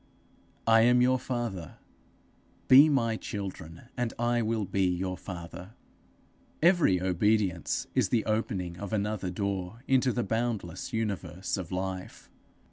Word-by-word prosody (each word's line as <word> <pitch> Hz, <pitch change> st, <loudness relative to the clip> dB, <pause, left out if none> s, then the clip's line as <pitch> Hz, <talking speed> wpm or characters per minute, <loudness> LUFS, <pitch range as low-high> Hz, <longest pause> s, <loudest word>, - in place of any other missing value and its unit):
'I 115 Hz, 0 st, +6 dB
am 125 Hz, +1 st, +5 dB
your 130 Hz, +1 st, +3 dB
father; 120 Hz, -, -4 dB, 0.9 s
be 140 Hz, +4 st, +8 dB
my 115 Hz, -6 st, +1 dB
children, 95 Hz, -7 st, -7 dB
and 120 Hz, -2 st, -2 dB
I 120 Hz, 0 st, +1 dB
will 110 Hz, -2 st, -1 dB
be 95 Hz, 0 st, +1 dB
your 90 Hz, +1 st, -1 dB
father.' 90 Hz, +3 st, -9 dB, 0.8 s
Every 170 Hz, -, +4 dB
obedience 95 Hz, -1 st, +1 dB
is -, -, +2 dB
the 115 Hz, -, +1 dB
opening 95 Hz, -5 st, -2 dB
of 100 Hz, +1 st, -6 dB
another 105 Hz, -2 st, -1 dB
door 100 Hz, +3 st, -3 dB
into 130 Hz, -1 st, +3 dB
the 120 Hz, -, -1 dB
boundless 110 Hz, -5 st, -3 dB
universe 95 Hz, -6 st, -3 dB
of 95 Hz, -4 st, -6 dB
life. 95 Hz, 0 st, -5 dB
105 Hz, 125 wpm, -29 LUFS, 90-120 Hz, 0.9 s, be